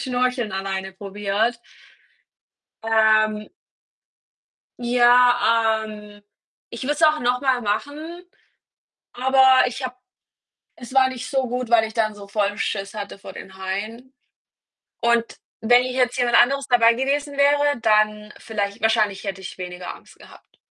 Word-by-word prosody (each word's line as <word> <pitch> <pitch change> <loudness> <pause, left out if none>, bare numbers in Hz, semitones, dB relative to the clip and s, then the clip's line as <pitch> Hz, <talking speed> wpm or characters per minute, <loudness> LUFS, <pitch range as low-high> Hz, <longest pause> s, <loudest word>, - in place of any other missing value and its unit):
Schnorcheln 250 -3 -1
alleine 190 0 -4
probiert. 205 +4 -2 1.2
Ähm 215 -1 +2 1.3
ja, 240 -2 +3
ähm, 210 -1 -11 0.5
ich 235 - -7
würde 285 +3 0
es 305 +2 -3
auch 305 -1 +4
noch 245 +1 0
mal 260 -3 +1
machen, 295 +11 -4 0.9
aber 260 +1 +4
ich 255 +2 -5
habe 250 -1 -5 0.8
es 245 +1 -11
war 265 -1 +5
nicht 255 -1 -7
so 265 -2 -1
gut, 250 0 -4
weil 225 -1 +5
ich 220 - -9
dann 215 -2 0
so 205 -1 -12
vollen 205 0 -1
Schiss 195 -1 -3
hatte 205 -2 -7
vor 195 - -11
den 190 - -11
Haien. 215 +7 -6 0.9
Und 235 0 +2 0.4
wenn 245 +2 +4
hier 255 - -4
jetzt 250 -1 0
jemand 245 -1 +1
anderes 275 +3 +3
dabei 235 -2 +4
gewesen 280 +3 -2
wäre, 285 -1 +2
dann 215 -1 +1
vielleicht 205 -3 -4
wahrscheinlich 215 -3 +1
hätte 195 -2 -5
ich 190 - -9
weniger 180 -1 -7
Angst - - -19
gehabt. - - -18
230 Hz, 140 wpm, -22 LUFS, 210-255 Hz, 1.3 s, war